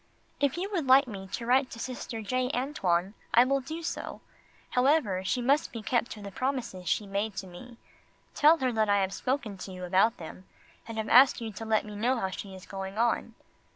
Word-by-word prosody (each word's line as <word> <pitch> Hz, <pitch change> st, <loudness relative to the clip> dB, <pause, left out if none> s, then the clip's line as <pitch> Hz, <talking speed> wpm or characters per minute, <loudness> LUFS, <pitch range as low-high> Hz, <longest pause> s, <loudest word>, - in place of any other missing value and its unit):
If 285 Hz, +2 st, +1 dB
you 370 Hz, +3 st, -2 dB
would 335 Hz, -9 st, -1 dB
like 265 Hz, +1 st, +6 dB
me 195 Hz, -4 st, -7 dB
to 230 Hz, +5 st, -5 dB
write 255 Hz, +2 st, +3 dB
to -, -, -9 dB
Sister 240 Hz, -2 st, -5 dB
J. 255 Hz, +4 st, 0 dB
Antoine 195 Hz, -, 0 dB, 0.2 s
I 240 Hz, -, +8 dB
will 275 Hz, +1 st, +1 dB
do 320 Hz, +5 st, -6 dB
so. 340 Hz, -, -5 dB, 0.5 s
However, 250 Hz, -8 st, +2 dB
she 245 Hz, +6 st, -1 dB
must 280 Hz, +4 st, +2 dB
be 230 Hz, -2 st, -7 dB
kept 240 Hz, +2 st, 0 dB
to 210 Hz, -, -11 dB
the 200 Hz, -, -7 dB
promises 245 Hz, -, -3 dB
she 210 Hz, -, +1 dB
made 200 Hz, +1 st, -2 dB
to 190 Hz, 0 st, -4 dB
me 225 Hz, +7 st, -12 dB, 0.6 s
tell 310 Hz, +3 st, +6 dB
her 260 Hz, -4 st, 0 dB
that 220 Hz, -2 st, +1 dB
I 200 Hz, 0 st, +4 dB
have 190 Hz, 0 st, -1 dB
spoken 235 Hz, -5 st, -2 dB
to 190 Hz, -, -7 dB
you 185 Hz, 0 st, -8 dB
about 195 Hz, +6 st, +3 dB
them 175 Hz, +3 st, -10 dB, 0.4 s
and 230 Hz, -1 st, -6 dB
have 220 Hz, -, -2 dB
asked 260 Hz, +3 st, +7 dB
you 225 Hz, -2 st, -5 dB
to 225 Hz, +2 st, -7 dB
let 220 Hz, -1 st, +1 dB
me 210 Hz, -1 st, -8 dB
know 245 Hz, +5 st, +1 dB
how 190 Hz, -3 st, -2 dB
she 190 Hz, 0 st, -7 dB
is 185 Hz, -, -12 dB
going 195 Hz, +1 st, -6 dB
on. 230 Hz, 0 st, 0 dB
230 Hz, 220 wpm, -29 LUFS, 195-255 Hz, 0.6 s, I